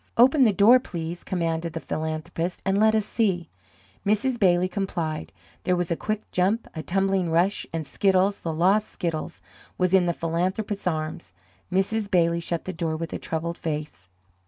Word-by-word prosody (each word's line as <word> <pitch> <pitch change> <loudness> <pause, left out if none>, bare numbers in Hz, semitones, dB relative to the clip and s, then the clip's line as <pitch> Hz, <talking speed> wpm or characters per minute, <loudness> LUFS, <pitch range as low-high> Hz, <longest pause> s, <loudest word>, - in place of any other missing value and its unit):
"Open 265 +5 +6
the 235 -4 +6
door, 210 +6 +6
please," 170 -7 -6
commanded 165 -2 -2
the 165 - -3
philanthropist, 160 +4 -3
"and 195 +1 +2
let 220 +1 +5
us 215 -2 +1
see." 190 -8 0 0.5
Mrs. 230 +5 +1
Bailey 180 -2 +4
complied. 175 -6 -3 0.3
There 180 - +1
was 175 -1 -2
a - - +2
quick 215 +4 -3
jump, 195 +6 +1
a 160 - -4
tumbling 190 0 0
rush, 175 +5 +1
and 165 -1 -3
Skiddles, 195 +5 +2
the 165 - -2
lost 190 +7 +3
Skiddles, 155 - -4 0.4
was 180 0 +1
in 185 -2 +5
the 170 - +1
philanthropist's 185 +5 -2
arms. 155 - -3 0.4
Mrs. 200 +3 0
Bailey 170 -2 +3
shut 170 0 -3
the 185 - -4
door 165 -1 -2
with 165 0 -5
a - - -3
troubled 170 +1 -3
face. 150 - -5
180 Hz, 170 wpm, -25 LUFS, 165-200 Hz, 0.5 s, Open